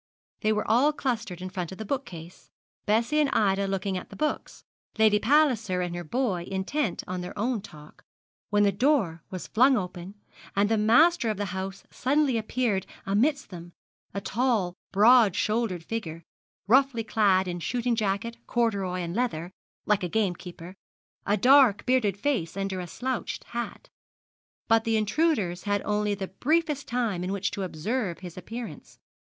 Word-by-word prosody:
They 215 Hz, -, +1 dB
were 215 Hz, 0 st, -1 dB
all 255 Hz, +7 st, +4 dB
clustered 225 Hz, -, -3 dB
in 185 Hz, -, -6 dB
front 180 Hz, -2 st, -4 dB
of 190 Hz, -, -8 dB
the 220 Hz, -, -6 dB
bookcase, 180 Hz, -, -6 dB, 0.4 s
Bessie 235 Hz, +8 st, +2 dB
and 295 Hz, -2 st, +3 dB
Ida 200 Hz, -1 st, +2 dB
looking 195 Hz, -1 st, -2 dB
at -, -, -13 dB
the -, -, -11 dB
books, 300 Hz, 0 st, -3 dB, 0.3 s
Lady 215 Hz, -1 st, +5 dB
Palliser 225 Hz, -8 st, +2 dB
and 175 Hz, -1 st, -3 dB
her 175 Hz, -, -4 dB
boy 190 Hz, -, -1 dB
intent 195 Hz, -, -2 dB
on 180 Hz, 0 st, -4 dB
their 180 Hz, -, -7 dB
own 230 Hz, +1 st, 0 dB
talk, 150 Hz, -4 st, -14 dB, 0.5 s
when 205 Hz, 0 st, +3 dB
the 200 Hz, -, +4 dB
door 200 Hz, -, +1 dB
was 185 Hz, -2 st, -6 dB
flung 255 Hz, +4 st, +4 dB
open, 180 Hz, 0 st, -6 dB, 0.4 s
and 200 Hz, +1 st, +2 dB
the 225 Hz, -, +2 dB
master 240 Hz, +5 st, +4 dB
of 215 Hz, -, -2 dB
the 205 Hz, -, -2 dB
house 190 Hz, +1 st, -5 dB
suddenly 280 Hz, 0 st, +1 dB
appeared 220 Hz, -3 st, -1 dB, 0.2 s
amidst 245 Hz, +7 st, +1 dB
them 175 Hz, -1 st, -9 dB, 0.4 s
a 200 Hz, -, -3 dB
tall, 215 Hz, -4 st, 0 dB, 0.2 s
broad 220 Hz, 0 st, +6 dB
shouldered 215 Hz, -6 st, 0 dB
figure, 165 Hz, -5 st, -5 dB, 0.4 s
roughly 255 Hz, +1 st, +3 dB
clad 200 Hz, -4 st, +2 dB
in 175 Hz, -1 st, -3 dB
shooting 240 Hz, +6 st, -1 dB
jacket, 220 Hz, +2 st, -1 dB
corduroy, 200 Hz, -6 st, 0 dB
and 170 Hz, +1 st, -4 dB
leather, 180 Hz, -8 st, -2 dB, 0.3 s
like 210 Hz, -1 st, +2 dB
a 180 Hz, -, -2 dB
gamekeeper 180 Hz, -3 st, -3 dB, 0.5 s
a 205 Hz, +1 st, +3 dB
dark 250 Hz, -3 st, +5 dB
bearded 245 Hz, -7 st, +2 dB
face 200 Hz, -, -1 dB
under 195 Hz, -1 st, -2 dB
a 180 Hz, -, -5 dB
slouched 255 Hz, +7 st, -4 dB
hat. 235 Hz, 0 st, -5 dB, 0.8 s
But 225 Hz, 0 st, +4 dB
the 225 Hz, -1 st, +1 dB
intruders 215 Hz, -, 0 dB
had 205 Hz, -1 st, 0 dB
only 210 Hz, 0 st, 0 dB
the 190 Hz, -1 st, -5 dB
briefest 300 Hz, -, 0 dB
time 225 Hz, -7 st, -1 dB
in 185 Hz, -, -2 dB
which 200 Hz, 0 st, -1 dB
to 200 Hz, -, -4 dB
observe 190 Hz, +3 st, -2 dB
his 180 Hz, -3 st, -8 dB
appearance. 225 Hz, +6 st, -8 dB
210 Hz, 165 wpm, -27 LUFS, 185-240 Hz, 0.8 s, broad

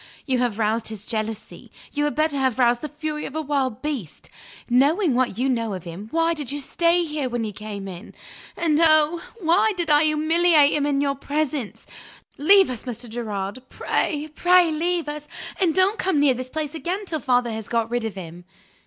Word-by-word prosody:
You 260 Hz, -3 st, 0 dB
have 240 Hz, -4 st, 0 dB
roused 225 Hz, +1 st, 0 dB
his 220 Hz, -2 st, -4 dB
jealousy. 220 Hz, -1 st, -5 dB, 0.2 s
You 295 Hz, 0 st, 0 dB
had 295 Hz, -, -1 dB
better 310 Hz, -1 st, +1 dB
have 260 Hz, -3 st, +1 dB
roused 240 Hz, -1 st, +3 dB
the 305 Hz, -, -3 dB
fury 300 Hz, 0 st, -4 dB
of 280 Hz, -, -8 dB
a 315 Hz, -, -1 dB
wild 270 Hz, -5 st, -1 dB
beast. 270 Hz, -, -5 dB, 0.4 s
Knowing 285 Hz, -, +3 dB
what 250 Hz, -4 st, 0 dB
you 255 Hz, +3 st, +1 dB
know 230 Hz, -5 st, -1 dB
of 180 Hz, -, -8 dB
him, 175 Hz, +5 st, -8 dB
why 330 Hz, +4 st, +1 dB
did 295 Hz, -5 st, -6 dB
you 290 Hz, -, -3 dB
stay 340 Hz, +5 st, +2 dB
here, 300 Hz, -5 st, -3 dB
when 240 Hz, -1 st, -2 dB
he 215 Hz, -, -3 dB
came 205 Hz, -1 st, -7 dB
in? 180 Hz, -2 st, -10 dB, 0.4 s
And, 315 Hz, -3 st, +2 dB
oh, 310 Hz, +1 st, +4 dB, 0.2 s
why 350 Hz, +6 st, +3 dB
did 340 Hz, -3 st, -1 dB
I 295 Hz, +1 st, +5 dB
humiliate 310 Hz, 0 st, +4 dB
him 290 Hz, -1 st, +1 dB
in 280 Hz, -1 st, +1 dB
your 280 Hz, -1 st, +1 dB
presence? 280 Hz, -3 st, -3 dB, 0.5 s
Leave 385 Hz, +1 st, +5 dB
us, 245 Hz, -1 st, -6 dB
Mr. 240 Hz, -1 st, -5 dB
Gerard 215 Hz, -2 st, -4 dB
pray, 300 Hz, -1 st, -1 dB
pray 355 Hz, 0 st, +4 dB
leave 335 Hz, +1 st, -1 dB
us, 295 Hz, 0 st, -6 dB, 0.3 s
and 350 Hz, -5 st, +2 dB
don't 380 Hz, +3 st, +2 dB
come 370 Hz, -6 st, +1 dB
near 285 Hz, -2 st, +4 dB
this 255 Hz, +1 st, -6 dB
place 305 Hz, 0 st, -4 dB
again 360 Hz, +5 st, -3 dB
till 320 Hz, -4 st, -3 dB
father 245 Hz, -2 st, +1 dB
has 220 Hz, -1 st, -5 dB
got 230 Hz, -1 st, 0 dB
rid 240 Hz, -1 st, -1 dB
of 220 Hz, -3 st, -4 dB
him." 175 Hz, -1 st, -9 dB
285 Hz, 200 wpm, -23 LUFS, 230-315 Hz, 0.5 s, I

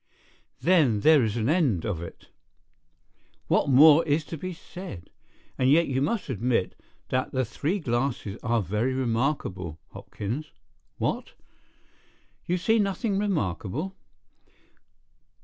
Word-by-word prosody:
"Then 150 Hz, -, +3 dB
there 155 Hz, -1 st, +6 dB
is 110 Hz, 0 st, -1 dB
an 115 Hz, 0 st, 0 dB
end 145 Hz, -, +2 dB
of 95 Hz, -7 st, -2 dB
it. 85 Hz, -, -10 dB, 1.2 s
What -, -, +2 dB
more 150 Hz, +4 st, +7 dB
is 150 Hz, 0 st, +1 dB
to 165 Hz, -, -6 dB
be 185 Hz, +4 st, -5 dB
said? 180 Hz, -, -10 dB, 0.5 s
And 130 Hz, 0 st, +3 dB
yet, 165 Hz, +4 st, +4 dB
you 130 Hz, -1 st, -1 dB
must 195 Hz, +8 st, -1 dB
admit, 120 Hz, -5 st, 0 dB, 0.4 s
that 130 Hz, 0 st, -1 dB
the 130 Hz, -1 st, +1 dB
three 145 Hz, -, -2 dB
glasses 120 Hz, -, -2 dB
are 115 Hz, -2 st, 0 dB
very 110 Hz, +7 st, -1 dB
remarkable, 115 Hz, -, -2 dB
Hopkins. 125 Hz, +10 st, -6 dB, 0.5 s
What? -, -, -2 dB, 1.1 s
You 180 Hz, -, +1 dB
see 220 Hz, +6 st, +2 dB
nothing 200 Hz, 0 st, 0 dB
remarkable? 155 Hz, -, -2 dB
135 Hz, 120 wpm, -26 LUFS, 110-165 Hz, 1.2 s, more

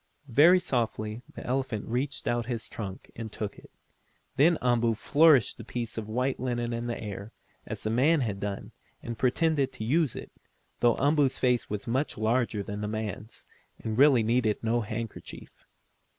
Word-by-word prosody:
Very 165 Hz, +8 st, +7 dB
softly 115 Hz, -8 st, -2 dB
the -, -, -8 dB
elephant 130 Hz, -4 st, -2 dB
reached 130 Hz, +4 st, -2 dB
put 120 Hz, -1 st, 0 dB
his 115 Hz, -4 st, -3 dB
trunk 95 Hz, -4 st, -7 dB
and 110 Hz, -2 st, -6 dB
took 105 Hz, -2 st, -5 dB
it. -, -, -17 dB, 0.7 s
Then 160 Hz, +5 st, +5 dB
Umboo 120 Hz, -2 st, +2 dB
flourished 145 Hz, 0 st, +4 dB
the -, -, -7 dB
piece 120 Hz, -2 st, -4 dB
of 110 Hz, -2 st, -4 dB
white 125 Hz, +4 st, -1 dB
linen 120 Hz, -2 st, -2 dB
in 115 Hz, +1 st, -3 dB
the 120 Hz, -, -3 dB
air, 105 Hz, 0 st, -7 dB, 0.3 s
as -, -, -5 dB
the 110 Hz, -, -1 dB
man 145 Hz, +7 st, +3 dB
had 105 Hz, -5 st, -2 dB
done, 100 Hz, -1 st, -4 dB, 0.3 s
and 120 Hz, -, -4 dB
pretended 135 Hz, +3 st, +1 dB
to 130 Hz, -, -6 dB
use 145 Hz, +3 st, +1 dB
it, -, -, -8 dB, 0.5 s
though 120 Hz, -1 st, +4 dB
Umboo's 145 Hz, -1 st, +2 dB
face 125 Hz, -7 st, +1 dB
was 105 Hz, -1 st, -4 dB
much 130 Hz, +5 st, -1 dB
larger 110 Hz, -1 st, +1 dB
than 100 Hz, +1 st, -5 dB
the 105 Hz, -, -2 dB
man's, 110 Hz, 0 st, -5 dB, 0.3 s
and 110 Hz, -1 st, -4 dB
really 135 Hz, -2 st, +6 dB
needed 115 Hz, -1 st, +1 dB
no 115 Hz, +1 st, +1 dB
handkerchief. 110 Hz, 0 st, -6 dB
120 Hz, 170 wpm, -28 LUFS, 110-130 Hz, 0.7 s, Very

